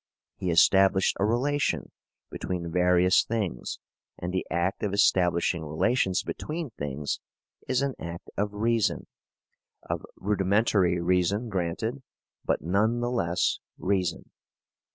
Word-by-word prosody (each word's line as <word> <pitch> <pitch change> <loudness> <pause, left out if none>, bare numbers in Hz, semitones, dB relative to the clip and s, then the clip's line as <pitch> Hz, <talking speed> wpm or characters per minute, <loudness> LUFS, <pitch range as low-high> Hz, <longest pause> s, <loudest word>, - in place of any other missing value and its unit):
He 95 -2 -2
established 95 +3 +4
a 100 - +3
relation 135 +6 0 0.4
between 85 -2 -4
various 90 +1 +4
things, 105 - -3 0.4
and 90 +1 -4
the 95 - -1
act 85 +3 -1
of 100 -2 -1
establishing 90 -4 +2
relations 90 - +1
between 155 -3 -5
things 70 -4 -4 0.5
is 130 - +1
an 140 -1 -1
act 85 0 -7
of 105 0 -1
reason 110 +1 0 0.8
of - - -4
rudimentary 100 -2 +2
reason, 90 +6 +1
granted, 105 +7 -2 0.4
but - - 0
none 105 +8 +1
the 120 0 -1
less 90 -8 0 0.2
of - - -17
reason. 95 -2 -1
95 Hz, 120 wpm, -27 LUFS, 85-110 Hz, 0.8 s, established